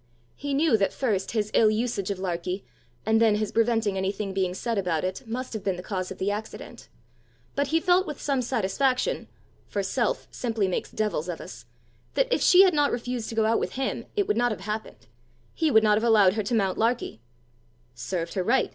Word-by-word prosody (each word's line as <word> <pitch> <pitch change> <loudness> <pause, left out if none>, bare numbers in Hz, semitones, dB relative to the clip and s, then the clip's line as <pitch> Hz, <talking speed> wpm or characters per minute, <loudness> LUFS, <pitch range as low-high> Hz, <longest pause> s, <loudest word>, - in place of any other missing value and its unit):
He 285 -1 -3
knew 290 -5 +4
that 195 -2 +1
first 210 -8 -1
his 215 -2 -1
ill 220 - +5
usage 215 -3 -1
of 200 - -2
Larkie, 180 +1 -3 0.4
and 220 +1 +3
then 220 -2 +5
his 210 0 -1
preventing 225 -3 +1
anything 195 +1 -2
being 185 -2 -1
said 230 +2 -1
about 175 -5 -1
it, 185 +1 -3
must 250 +3 -4
have 215 -3 -5
been 195 -2 0
the 180 - -8
cause 185 -2 -3
of 190 - -7
the 200 +2 0
accident; 215 +2 -7 0.6
but 285 0 0
he 325 +3 +2
felt 365 +2 +3
with 300 - -6
some 275 -3 0
satisfaction 250 +2 0 0.4
for - - -2
self - - -1
simply 225 -5 -1
makes 185 - -2
devils 195 -6 -2
of 170 - -4
us - - -10 0.5
that - - +2
if - - +1
she 375 +1 +7
had 375 -2 +4
not 290 -1 +2
refused 245 -1 -3
to 225 - -6
go 220 -1 +2
out 225 +1 +2
with - - -3
him, 265 0 -3
it 405 -2 +1
would 420 - +1
not 245 0 +2
have 210 - -5
happened; 210 - -6 0.5
he 320 -1 +1
would 220 -5 +5
not 210 -1 +4
have 220 - -1
allowed 210 -5 +5
her 215 - -1
to 210 +4 -1
mount 195 -4 0
Larkie. 230 - 0 0.7
"Served 165 +8 -4
her 185 - -1
right!" 235 +8 +2
220 Hz, 215 wpm, -26 LUFS, 190-245 Hz, 0.7 s, she